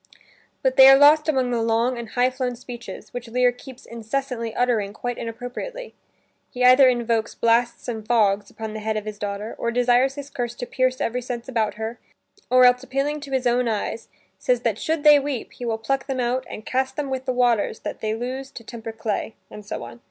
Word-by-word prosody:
But 260 -1 +1
they 265 0 +10
are 270 0 +9
lost 300 +2 +6
among 260 -4 +1
long 230 +1 +1
and 235 -2 -7
high 250 +2 +2
flown 255 -1 -3
speeches, 240 -1 -10
which 245 -1 -6
Lear 250 +1 +3
keeps 255 +1 -13
incessantly 235 0 -4
uttering 225 -5 0
quite 245 +2 -4
inappropriately. 245 - -6 0.6
He 250 -1 -3
either 255 +1 +8
invokes 235 -2 0
"blasts 235 +1 +1
and 225 -3 -4
fogs" 205 -4 +2
upon 220 -1 -7
the 215 - -5
head 215 0 -2
of 215 - -4
his 210 -1 -7
daughter, 205 +2 -4
or 235 - -1
desires 245 +2 +2
his 285 -1 -8
curse 240 -1 -4
to 245 - -5
"pierce 255 +1 0
every 245 +2 -1
sense 240 0 -6
about 225 -5 -1
her," 220 +2 -5 0.5
or 255 0 +6
else 250 0 +5
appealing 275 +3 -2
to 285 -2 -10
his 260 -1 0
own 245 0 +2
eyes, 225 +1 -3 0.3
says - - +1
that - - -1
should 320 -2 -1
they 295 -1 +8
weep, 275 -4 -4
he 245 - -7
will 225 -1 -1
pluck 270 +5 -2
them 265 -2 -2
out 250 +1 -1
and 215 - -8
"cast 265 +1 -1
them 285 -2 -3
with 260 0 -3
the 260 - 0
waters 240 -4 +1
that - - -5
they 215 0 -1
lose 260 +3 -5
to 240 - -11
temper 225 0 -7
clay." 220 0 -3 0.2
And 210 - -9
so 205 - -6
on. 120 0 -10
245 Hz, 210 wpm, -23 LUFS, 225-260 Hz, 0.6 s, they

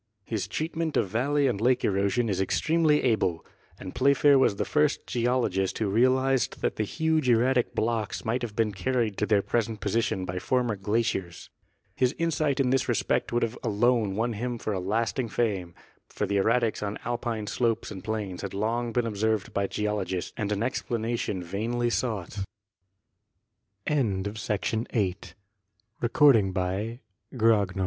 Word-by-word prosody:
His 110 -4 -3
treatment 160 0 -2
of 95 - +1
valley 140 +7 +1
and 120 -6 0
lake 125 +1 +2
erosion 100 +4 +1
is 95 -3 0
extremely 155 - +2
able. 100 -9 +1 0.3
And 95 - -7
Playfair 140 0 +4
was 110 - +3
the - - -2
first 150 -1 +1
geologist 115 -6 0
who 105 -3 -1
realized 130 +3 +2
that - - 0
the 110 - +1
huge 160 +3 0
erratic 125 +2 +2
blocks 110 -2 -1
might 115 +3 0
have 115 -4 -5
been 110 -2 +1
carried 115 +1 -1
to 105 - 0
their 100 -2 +3
present 115 -2 -1
position 100 -2 0
by 90 0 -3
former 125 0 0
glaciers. 100 -3 -2 0.4
His 130 +2 +1
insight 155 -4 0
in 130 -2 +2
this 135 -1 +1
respect - - 0
would 120 0 +1 0.2
alone 115 0 +2
have 95 - -5
won 120 +1 -1
for 110 - -3
him - - -1
a - - -2
lasting 115 +3 0
fame, 100 -8 -1 0.3
for - - -2
the 100 - 0
erratics 115 +3 +2
on 105 0 -3
Alpine 120 -2 -2
slopes 115 +1 -1
and 95 -3 -8
plains 105 -5 -3
had 100 -1 -5
long 115 +3 -1
been 120 +1 0
observed 110 -1 -1
by 100 0 0
geologists 100 -4 -2
and 105 -3 -2
an 105 +1 0
explanation 115 -5 -2
vainly 115 +7 -1
sou 110 -7 -1
115 Hz, 145 wpm, -27 LUFS, 100-125 Hz, 0.4 s, Playfair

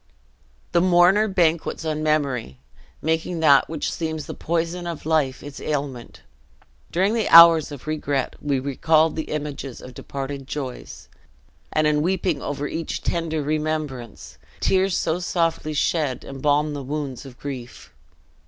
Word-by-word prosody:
The 170 - +3
mourner 185 +4 +5
banquets 170 -4 0
on 155 -1 -2
memory; 140 - 0 0.5
making 160 +2 -1
that 140 -4 +5
which 160 -2 -2
seems 160 -3 -3
the - - -6
poison 170 +1 -2
of 170 -3 -6
life, 150 -5 0
its 145 -1 -9
ailment. 140 -5 -4 0.7
During 190 +5 +2
the 225 -3 0
hours 165 -2 +9
of 140 -3 -9
regret 145 -3 -2
we 140 -2 0
recall 155 +4 +2
the 160 0 -4
images 145 -4 -5
of 130 - -11
departed 135 +1 -6
joys; 135 -4 -6 0.6
and 155 - +2
in 150 -1 +2
weeping 175 -3 0
over 145 0 -3
each 165 +2 -4
tender 160 -3 -1
remembrance, 150 -5 -4 0.2
tears 190 0 +2
so 165 +2 0
softly 165 -3 -1
shed 150 -4 0
embalm 145 +2 0
the 145 - -4
wounds 140 -2 -4
of 130 -3 -12
grief. 130 -4 -8
155 Hz, 140 wpm, -23 LUFS, 140-165 Hz, 0.7 s, hours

